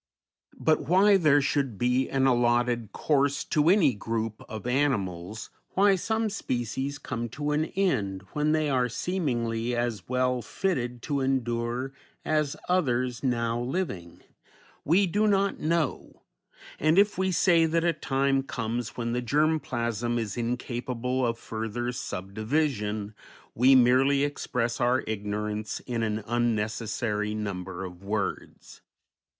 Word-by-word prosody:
But 155 -1 +1
why 195 +4 +5
there 150 -5 +4
should 135 -6 0
be 125 +3 +1
an 135 0 +1
allotted 120 -2 +2
course 140 -1 +1
to 150 +1 +2
any 175 -9 +5
group 110 0 -3
of 110 0 -7
animals, 110 -7 -1 0.2
why 200 0 +5
some 220 +4 -1
species 135 - -3
come 120 -4 -4
to 145 +5 -3
an 150 +1 +1
end 110 - -1
when 150 +1 +1
they 155 -1 +2
are 125 -3 +1
seemingly 120 -8 -1
as 120 -6 -2
well 125 -1 +1
fitted 125 - -2
to 145 -2 -1
endure 125 -1 -1 0.3
as 150 -2 +1
others 125 -9 +1
now 120 -2 0
living, 120 - -4 0.6
we 180 +6 +4
do 205 +4 +1
not 200 -1 +2
know, 160 -3 -2 0.6
and 155 +3 +3
if 205 -1 +4
we 190 0 +1
say 165 -1 +4
that 165 +1 +1
a 170 -1 +3
time 135 -2 +1
comes 115 -3 -4
when 120 -1 -2
the 125 - 0
germ 155 +5 +2
plasm 120 -2 -2
is 110 -3 -3
incapable 125 +1 -2
of 115 -1 0
further 115 +2 -4
subdivision, 110 0 -2 0.4
we 130 +3 +5
merely 130 +3 +4
express 125 -5 -2
our 125 +2 +2
ignorance 105 0 -3
in 120 -2 -3
an 110 -1 -1
unnecessary 110 -2 -1
number 95 -3 -4
of 90 0 -10
words. 100 +1 -4
125 Hz, 135 wpm, -27 LUFS, 115-150 Hz, 0.6 s, why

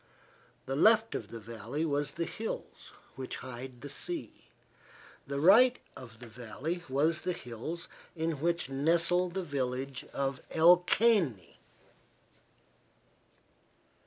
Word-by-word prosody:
The 135 - -2
left 220 +8 +5
of - - -4
the 115 - -8
valley 115 +7 -4
was 145 -1 -1
the 170 - -2
hills 220 +6 -6 0.2
which 130 -1 -5
hide 125 0 -8
the 145 - -7
sea. 345 - -6 0.8
The 140 0 -2
right 235 - +7 0.2
of 115 -3 -11
the 120 - -10
valley 125 +9 -5
was 155 +4 +1
the 180 - -1
hills 140 +7 -6 0.3
in 160 -3 -2
which 170 +1 0
nestle 170 +6 +2
the 190 +2 -3
village 135 -3 -3
of 135 -1 -2
El 170 +2 +7
Caney. 175 - +1
145 Hz, 120 wpm, -31 LUFS, 130-175 Hz, 0.8 s, right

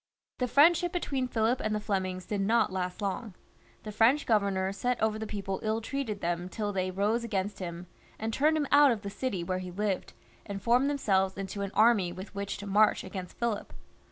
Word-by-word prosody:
The 250 - +1
friendship 335 +7 +5
between 275 -8 -1
Philip 230 +1 +1
and 215 0 -1
the - - 0
Flemings 185 -3 -2
did 205 0 -2
not 220 0 +2
last 180 +1 -3
long. 200 0 -3 0.5
The 215 - -6
French 230 +8 +3
governor 195 -3 +1
set 245 +5 -1
over 215 0 +1
the 220 - -4
people 195 -2 -4
ill 220 +1 0
treated 230 -3 -4
them 175 +1 -2
till 205 0 -3
they 185 -1 -1
rose 205 +5 0
against 205 -3 -2
him, 175 -1 -6 0.3
and 220 +1 -3
turned 305 +5 +3
him 300 - 0
out 290 0 +7
of 225 -4 -1
the 200 - -5
city 200 -7 -3
where 185 +1 -2
he 185 -1 -6
lived, 195 +1 -2 0.3
and 200 -1 -5
formed 245 +5 +3
themselves 195 -9 +1
into 195 +1 -5
an 200 - -2
army 215 -5 +4
with 185 +4 -9
which 200 0 -4
to 205 - -8
march 210 +2 +3
against 185 -3 -7
Philip. 235 -3 -2
210 Hz, 205 wpm, -29 LUFS, 190-235 Hz, 0.5 s, out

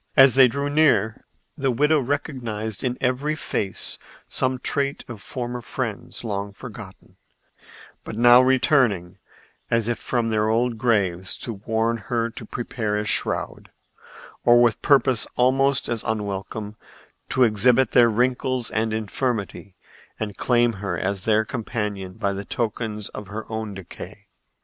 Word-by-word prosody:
As 135 -2 +8
they 130 -1 +7
drew 140 +4 -2
near 145 -8 +2 0.3
the 135 -3 0
widow 150 +5 +3
recognized 120 -6 -3
in 125 -1 -1
every 130 +5 0
face 100 -9 -3 0.3
some 130 0 0
trait 140 +2 -2
of 115 -5 -9
former 125 -1 -5
friends 115 -2 -5
long 100 -2 -3
forgotten, - - -11 0.9
but - - -7
now 120 +2 +7
returning 130 - +2 0.5
as 115 -1 +1
if 120 -1 -1
from 120 -2 -1
their 110 -1 +1
old 115 0 +1
graves 95 -6 +1
to 115 - -4
warn 110 +3 -1
her 115 +1 -2
to 110 - -9
prepare 110 -3 -3
a 105 - -2
shroud, - - -2 0.7
or, 120 0 +6
with 120 -3 +3
purpose 135 -5 +4
almost 135 +2 +2
as 115 -2 -2
unwelcome, 105 0 -4 0.5
to 130 - +3
exhibit 120 +3 +3
their 120 -1 +6
wrinkles 125 +1 0
and 110 0 0
infirmity 110 -3 -3 0.4
and 105 -2 -4
claim 120 +2 +2
her 100 -1 -4
as 95 -1 -2
their 110 0 +3
companion 105 -5 -4
by 100 +1 -2
the 100 +1 -5
tokens 110 -3 -3
of 105 - -8
her 105 +3 -6
own 110 -2 -4
decay. 95 -2 -10
115 Hz, 140 wpm, -23 LUFS, 105-125 Hz, 0.9 s, As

